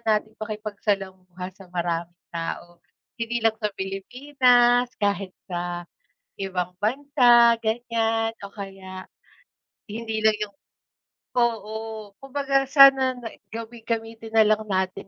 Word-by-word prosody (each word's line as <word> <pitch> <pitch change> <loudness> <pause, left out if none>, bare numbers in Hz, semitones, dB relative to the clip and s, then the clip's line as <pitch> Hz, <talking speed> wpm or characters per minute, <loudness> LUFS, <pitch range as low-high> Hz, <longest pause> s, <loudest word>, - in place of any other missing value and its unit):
nating 215 0 0
makipagsalamuha 195 -4 -4
sa 195 0 -15
maraming 175 -1 -2 0.2
tao. 170 +1 -5 0.4
Hindi 230 0 -2
lang 225 -1 +4
sa 210 - +1
Pilipinas, 245 +4 +3
kahit 200 -2 -1
sa 175 -1 -4 0.5
ibang 180 -2 -3
bansa, 240 0 +5
ganyan 225 0 0 0.2
o - - -14
kaya, 195 -2 -8 0.8
hindi 220 0 -4
lang 220 - +6
yung 205 -1 -4 0.8
oo, 220 -2 -2
kumbaga 275 0 0
sana 270 -2 +7
na 235 -2 -7 0.2
gami 230 +1 -8
gamitin 225 -1 -3
nalang 215 0 +4
natin 190 0 -1
220 Hz, 105 wpm, -25 LUFS, 195-235 Hz, 0.8 s, sana